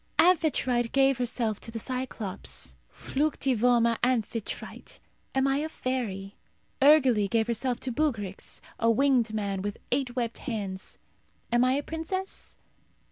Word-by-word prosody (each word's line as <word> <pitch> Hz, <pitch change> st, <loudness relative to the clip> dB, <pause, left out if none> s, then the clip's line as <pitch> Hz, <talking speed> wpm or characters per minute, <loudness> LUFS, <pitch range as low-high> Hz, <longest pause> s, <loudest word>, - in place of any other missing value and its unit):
Amphitrite 295 Hz, -9 st, +3 dB
gave 270 Hz, -1 st, +4 dB
herself 230 Hz, -3 st, -1 dB
to -, -, -8 dB
the 230 Hz, -, -5 dB
Cyclops. 245 Hz, -5 st, -4 dB, 0.2 s
Fluctivoma 245 Hz, -5 st, +1 dB
Amphitrite. 235 Hz, -3 st, -2 dB, 0.4 s
Am 265 Hz, 0 st, +3 dB
I 270 Hz, 0 st, +2 dB
a 310 Hz, +2 st, -2 dB
fairy? 215 Hz, -9 st, -3 dB, 0.5 s
Urgele 265 Hz, -8 st, +5 dB
gave 225 Hz, +1 st, +2 dB
herself 240 Hz, +2 st, -1 dB
to 260 Hz, -, -1 dB
Bugryx, 230 Hz, -9 st, -2 dB, 0.2 s
a 230 Hz, -, +3 dB
winged 245 Hz, -1 st, +3 dB
man, 200 Hz, -3 st, -2 dB
with 205 Hz, +1 st, -3 dB
eight 255 Hz, -1 st, 0 dB
webbed 235 Hz, -2 st, -2 dB
hands. 200 Hz, -6 st, -4 dB, 0.5 s
Am 240 Hz, +1 st, +4 dB
I 255 Hz, +1 st, +3 dB
a 285 Hz, +2 st, 0 dB
princess? 350 Hz, +5 st, -4 dB
245 Hz, 130 wpm, -28 LUFS, 220-270 Hz, 0.5 s, Urgele